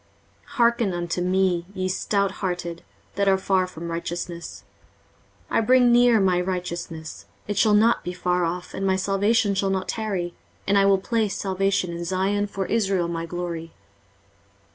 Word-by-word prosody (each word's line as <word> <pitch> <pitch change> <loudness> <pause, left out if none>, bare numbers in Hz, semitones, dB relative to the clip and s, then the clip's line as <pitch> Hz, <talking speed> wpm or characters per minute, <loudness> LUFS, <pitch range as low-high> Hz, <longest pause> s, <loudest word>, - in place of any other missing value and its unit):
23:046:012 - - -19
Hearken 235 -4 +2
unto 175 0 -2
me, 180 -1 +1
ye 185 0 -1
stouthearted, 185 -3 -2 0.3
that 200 0 0
are 190 0 +5
far 190 -1 +1
from 170 -1 -7
righteousness: 170 0 -5 0.9
23:046:013 - - +2
I - - +4
bring 245 +1 +5
near 240 -1 +5
my 185 -2 +2
righteousness; 175 -3 -5 0.2
it 205 - -2
shall 210 +1 +4
not 230 +3 +3
be 180 - -3
far 180 0 0
off, 175 +2 -3
and 195 - -4
my 190 - +3
salvation 200 +3 +2
shall 195 0 0
not 190 -1 -1
tarry: 195 -6 -2 0.3
and 200 - +2
I 195 - +4
will 195 0 +5
place 215 0 -1
salvation 195 -2 0
in 170 0 -5
Zion 190 +3 0
for 195 -1 -4
Israel 195 -5 +1
my 165 -1 -4
glory. 170 -1 -5
190 Hz, 165 wpm, -24 LUFS, 175-200 Hz, 0.9 s, are